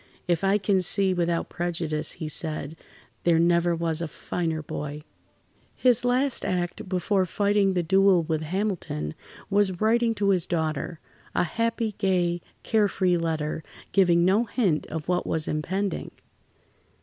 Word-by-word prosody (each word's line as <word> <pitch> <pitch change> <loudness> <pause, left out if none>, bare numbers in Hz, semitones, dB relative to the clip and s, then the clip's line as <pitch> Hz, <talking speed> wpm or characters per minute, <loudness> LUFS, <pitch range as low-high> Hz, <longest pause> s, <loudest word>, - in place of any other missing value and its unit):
"If 175 0 +1
I 195 +1 +4
can 195 -1 +1
see 190 +1 +3
without 170 -1 0
prejudice," 165 -3 -2
he 155 - -6
said, 155 0 -2 0.5
"there 170 -1 +4
never 170 +1 +3
was 165 -1 -1
a 170 - -2
finer 160 0 -3
boy." 150 0 -5 0.7
His 250 -2 +3
last 255 +2 +2
act 180 -1 -2
before 185 +1 +1
fighting 200 0 +2
the 175 - +1
duel 190 0 +4
with 155 0 -1
Hamilton, 165 - -2 0.4
was 195 -3 +2
writing 230 +1 +2
to 200 -1 +1
his 185 -4 +2
daughter—a 160 0 -3
happy, 230 +4 -1
gay, 175 -3 +1 0.2
care 215 -2 +3
free 185 -2 +1
letter, 160 -1 -2 0.3
giving 175 -3 +4
no 200 +6 +3
hint 200 -9 0
of 160 -1 -5
what 180 0 0
was 160 -1 0
impending. 190 +6 -2
175 Hz, 140 wpm, -26 LUFS, 160-200 Hz, 0.7 s, I